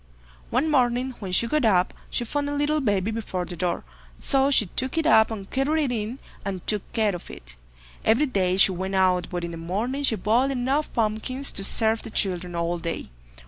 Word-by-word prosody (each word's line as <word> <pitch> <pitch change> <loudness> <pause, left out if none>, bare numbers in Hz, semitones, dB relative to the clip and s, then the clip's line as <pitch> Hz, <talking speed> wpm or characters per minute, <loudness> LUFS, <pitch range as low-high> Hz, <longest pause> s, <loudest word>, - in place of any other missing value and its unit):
One 260 +6 +1
morning 250 -1 +1
when 195 -3 -6
she 185 - +4
got 300 +5 0
up, 185 -5 +3 0.2
she 240 - -2
found 285 +4 -2
a 290 - -3
little 295 +1 +1
baby 205 -4 0
before 205 -5 -4
the 175 - -7
door, 175 0 -2 0.4
so 270 0 +2
she 265 -6 +4
took 260 - -3
it 325 - +1
up 220 -8 +5
and 205 -4 -6
carried 295 +6 0
it 270 - -1
in, 225 +2 -3 0.3
and 190 -3 -5
took 210 -3 -1
care 215 -3 +1
of 175 - -10
it. - - -9 0.5
Every 230 +7 +3
day 190 -8 0
she 195 - +6
went 190 +2 -4
out, 185 -1 +2
but 175 -1 -4
in 170 - -4
the 165 - -7
morning 210 +12 -3
she 265 -5 +2
boiled 225 +7 +1
enough 270 +3 -1
pumpkins 230 +5 0
to 195 - -2
serve 220 +2 +4
the - - -9
children 180 -4 0
all 170 +1 -1
day. 165 - -5
220 Hz, 210 wpm, -24 LUFS, 185-265 Hz, 0.5 s, she